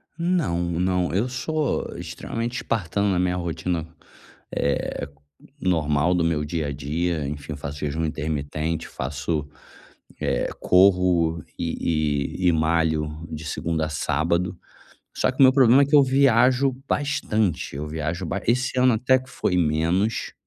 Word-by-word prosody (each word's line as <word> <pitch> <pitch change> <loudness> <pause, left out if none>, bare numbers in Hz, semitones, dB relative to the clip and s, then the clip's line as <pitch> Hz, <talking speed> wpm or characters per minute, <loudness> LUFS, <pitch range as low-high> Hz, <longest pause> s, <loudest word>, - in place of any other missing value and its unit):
Não 170 - 0 0.2
não, 90 -1 +1
eu 105 +7 +1
sou 150 +4 -2
extremamente 120 +2 -4
espartano 100 - -1
na 95 -2 +1
minha 90 0 +1
rotina, 85 -1 -3 0.7
eh, 70 0 -1 0.5
normal 80 -2 +1
do 90 -2 +1
meu 80 -2 0
dia 75 0 -2
a - - -2
dia, 75 +3 -2
enfim, 75 +1 -6
faço 70 +1 -6
jejum 75 +2 -2
intermitente, 75 +1 -3
faço, 75 +3 -3 0.7
eh, - - 0
corro 90 -4 +3
e 75 -3 -1
e 90 - +3
e - - +5
malho 80 -1 +1 0.2
de 80 0 -6
segunda 80 +1 -2
a - - -4
sábado. 85 +4 0 0.6
Só - - +1
que 130 - -15
o - - +8
meu 130 0 +7
problema 130 0 +6
é - - +2
que 140 +2 +2
eu 145 - +8
viajo 130 0 +4 0.2
bastante, 110 - -1
eu 75 +2 -4
viajo 80 +3 -3
ba 95 +4 -3
esse 125 +1 +1
ano 125 -1 +5
até 130 +4 +3
que 130 0 -15
foi 90 - -1
menos, 85 +6 0
85 Hz, 145 wpm, -24 LUFS, 75-115 Hz, 0.7 s, o